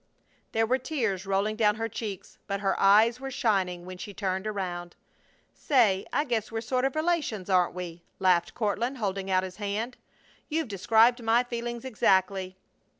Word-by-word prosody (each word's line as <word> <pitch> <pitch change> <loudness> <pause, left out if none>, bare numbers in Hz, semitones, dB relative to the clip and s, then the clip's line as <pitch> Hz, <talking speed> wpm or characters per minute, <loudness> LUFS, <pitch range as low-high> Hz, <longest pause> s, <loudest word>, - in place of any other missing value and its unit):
There 225 0 +2
were 255 +4 +1
tears 225 - -2
rolling 200 +2 +1
down 210 -2 +3
her 225 +1 -2
cheeks, 205 -3 -7
but 200 0 -2
her 195 -1 +2
eyes 220 +5 +5
were 270 0 -5
shining 190 -8 0
when 185 0 -9
she 200 +1 -8
turned 190 0 -2
around. 180 -4 -4 0.6
"Say, 220 -9 +2
I 290 - +1
guess 235 -5 -2
we're 225 0 -2
sort 255 +2 0
of 270 - -1
relations, 310 - -1
aren't 180 -1 +3
we?" 175 -2 -6 0.2
laughed 185 -3 +2
Courtland, 235 +4 -1
holding 195 -3 -2
out 185 0 +2
his 185 -1 -7
hand. 215 +4 -3 0.5
"You've 315 -4 -1
described 225 +5 +4
my 230 +2 +3
feelings 240 0 -5
exactly." 190 -5 +1
210 Hz, 165 wpm, -28 LUFS, 190-240 Hz, 0.6 s, eyes